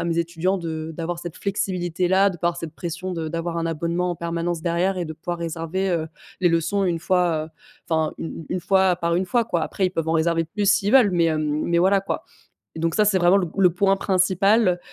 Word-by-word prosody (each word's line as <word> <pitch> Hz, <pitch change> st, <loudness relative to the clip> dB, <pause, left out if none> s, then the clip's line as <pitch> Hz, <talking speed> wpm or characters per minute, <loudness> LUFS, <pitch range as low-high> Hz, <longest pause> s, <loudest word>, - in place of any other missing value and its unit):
à -, -, -2 dB
mes 170 Hz, 0 st, -1 dB
étudiants 170 Hz, +3 st, 0 dB
de 160 Hz, -1 st, -5 dB
d'avoir 170 Hz, +1 st, -4 dB
cette 175 Hz, -2 st, -7 dB
flexibilité-là, 185 Hz, -1 st, +1 dB
de 180 Hz, -, -5 dB
pas 170 Hz, +1 st, 0 dB
avoir 175 Hz, 0 st, -3 dB
cette 160 Hz, -2 st, -7 dB
pression 180 Hz, +2 st, -5 dB
de 160 Hz, -1 st, -3 dB
d'avoir 165 Hz, +1 st, -3 dB
un 165 Hz, -, -1 dB
abonnement 170 Hz, +2 st, -1 dB
en 175 Hz, -, -4 dB
permanence 170 Hz, 0 st, -2 dB
derrière 180 Hz, +3 st, 0 dB
et 175 Hz, -, -2 dB
de 160 Hz, -, -6 dB
pouvoir 175 Hz, +2 st, -5 dB
réserver, 170 Hz, +3 st, -3 dB
heu, 165 Hz, -3 st, -1 dB, 0.3 s
les 175 Hz, -, +4 dB
leçons 180 Hz, +4 st, +1 dB
une 170 Hz, -2 st, 0 dB
fois, 175 Hz, -1 st, +1 dB
heu -, -, -11 dB, 0.4 s
enfin, 160 Hz, -1 st, +1 dB
une -, -, -4 dB
une 160 Hz, -, -8 dB
une 180 Hz, -, -1 dB
fois 190 Hz, 0 st, +3 dB
par 170 Hz, -1 st, -1 dB
une 185 Hz, +2 st, +1 dB
fois, 235 Hz, +4 st, +1 dB
quoi. 170 Hz, -7 st, -1 dB
Après, 190 Hz, +4 st, 0 dB
ils -, -, -2 dB
peuvent 165 Hz, -3 st, -2 dB
en -, -, +1 dB
réserver 165 Hz, +1 st, +2 dB
plus, 200 Hz, +4 st, -2 dB
s'ils 205 Hz, +1 st, +2 dB
veulent, 245 Hz, -7 st, +6 dB
mais 170 Hz, -1 st, +3 dB
hem, 155 Hz, -1 st, 0 dB
mais 170 Hz, 0 st, +1 dB
voilà, 195 Hz, +2 st, +4 dB
quoi, 200 Hz, +11 st, -4 dB, 0.5 s
donc 165 Hz, 0 st, -1 dB
ça, 215 Hz, -, +4 dB
c'est 200 Hz, -2 st, +3 dB
vraiment 175 Hz, +2 st, +5 dB
le 180 Hz, -3 st, 0 dB
p -, -, -20 dB
le 180 Hz, -3 st, +5 dB
point 195 Hz, +1 st, +3 dB
principal. 190 Hz, +1 st, +2 dB
175 Hz, 240 wpm, -23 LUFS, 165-190 Hz, 0.5 s, veulent